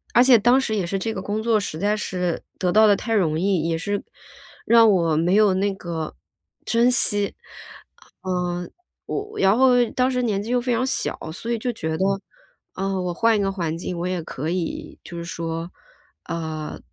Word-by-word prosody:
而 245 - +7
且 255 -2 +7
当 245 +5 +4
时 220 -4 -1
也 195 -4 0
是 195 +3 -2
这 225 +4 -2
个 190 - -4
工 205 +2 -2
作 220 -1 +2
实 160 -6 -5
在 205 +3 +1
是 180 -4 -2 0.2
得 180 -2 +1
到 215 +3 +6
得 205 -1 +5
太 225 +2 -2
容 160 -6 +1
易， 180 -3 +1
也 165 - 0
是 205 +5 -2 0.6
让 230 -1 +6
我 170 -5 +2
没 170 +3 +2
有 210 -2 +5
那 200 +1 +1
个 170 -4 -5 0.5
珍 235 +2 +3
惜。 205 -4 +2 0.9
嗯， 180 -1 -2 0.4
我 420 +1 -4
然 195 +3 +4
后 250 -1 +5
当 255 +1 +1
时 250 -1 0
年 210 -5 0
纪 230 - -5
又 250 0 +2
非 250 +1 -2
常 240 +2 +1
小， 265 - -2 0.2
所 230 +7 -5
以 235 - +1
就 245 +2 -2
觉 160 -7 -3
得， 190 - +1 0.7
呃， 195 0 -2
我 180 -1 -2
换 230 +5 +3
一 - - +1
个 195 -1 0
环 170 -5 -2
境 175 +1 -5
我 170 - -3
也 180 -1 -2
可 155 -1 -5
以 175 -2 -4
就 175 - -9
是 170 - -5
说， 165 0 -4 0.6
呃， 160 -2 -5
195 Hz, 215 characters per minute, -23 LUFS, 170-230 Hz, 0.9 s, 而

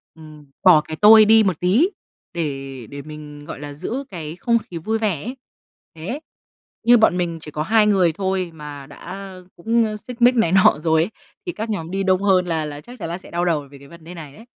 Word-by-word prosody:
ừm, 155 -2 -14 0.2
bỏ 170 -5 +7
cái 155 - -7
tôi 215 +1 +8
đi 220 +1 +6
một 185 -5 0
tí 215 - +3 0.4
để 135 -7 -5
để 140 0 -8
mình, 150 0 -10
gọi - - -8
là, 145 -1 -7
giữ 230 - -4
cái 160 -2 -7
không 235 +5 +1
khí 175 - -9
vui 220 +7 -2
vẻ 195 -9 -1
ấy. 255 +4 -6 0.6
Thế, 200 - -5 0.6
như 240 +1 +6
bọn 220 -5 +3
mình 170 -2 -2
chỉ 150 - -9
có 150 +1 -3
hai 215 +4 +3
người 185 -5 +3
thôi 190 0 -2
mà 145 -3 -9
đã, - - -13
ơ, 190 -1 -9
cũng, 225 +5 +1
ơ, 215 0 -4
xích 245 +2 -11
mích 250 +1 +6
này 225 -8 +2
nọ 195 -2 +5
rồi 160 0 +2
ấy, 195 - -5 0.3
thì 355 - -2
các 225 -7 -5
nhóm 170 -5 -4
đi 195 +1 -1
đông 190 0 +2
hơn 185 -2 +3
là 160 -2 -1
là 145 -1 -7
chắc 245 +4 -13
chắn 165 - -5
là 170 - -3
sẽ 185 - -15
đau 175 +1 -1
đầu 150 -5 0
về 140 - -12
cái 140 - -15
vấn 170 +1 -15
đề 170 +2 -10
này 150 -5 -10
ấy. 225 - -14
180 Hz, 245 wpm, -21 LUFS, 155-215 Hz, 0.6 s, tôi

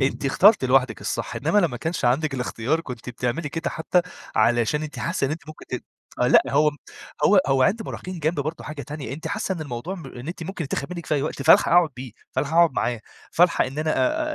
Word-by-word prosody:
أنتِ 135 +1 0
اخترتِ 185 +4 +5
لوحدِك 130 0 +2
الصح، - - -3
إنّما 210 - +2
لمّا 165 -11 +1
كانش 160 +4 -3
عندِك 135 +4 +2
الإختيار 125 +4 -1
كنتِ 125 -7 -8
بتعملي 125 +5 -2
كده 165 +3 -3
حتى 175 +2 +1 0.3
علشان 120 +6 +2
أنتِ 155 0 -7
حاسّة 170 -4 -1
إن - - -4
أنتِ 155 +2 -4
ممكن 155 - -11
ت - - -5 0.4
آآ، - - +3
لأ - - +7
هو 150 +2 +3
م 145 - -14 0.5
هو 195 +4 +6
هو 135 -1 +3
عِنْد 215 - +2
مراهقين 185 -4 -7
جنب 155 0 0
برضه 155 +4 -4
حاجة 150 -1 -6
تانية، 145 -5 -6
أنتِ 155 +4 -7
حاسّة 200 -2 -2
إن 170 - -7
الموضوع 145 +4 -5
م 165 -7 -9
إن 125 +3 -9
أنتِ 170 -1 -6
ممكن 170 -1 -5
يتاخد 140 +4 -4
منِّك 170 -2 -7
في - - 0
أي 140 - 0
وقت، 150 - -3
فالحق 160 - +6
اقعُد 175 -2 +5
بيه، 125 -2 -8 0.2
فالحق 145 +2 -1
اقعُد 170 -3 +6
معاه 120 -2 -1 0.3
فالحق 175 +1 +4
إن 130 +3 -6
أنا 155 0 0
أ 310 0 0
150 Hz, 230 wpm, -24 LUFS, 135-170 Hz, 0.5 s, لأ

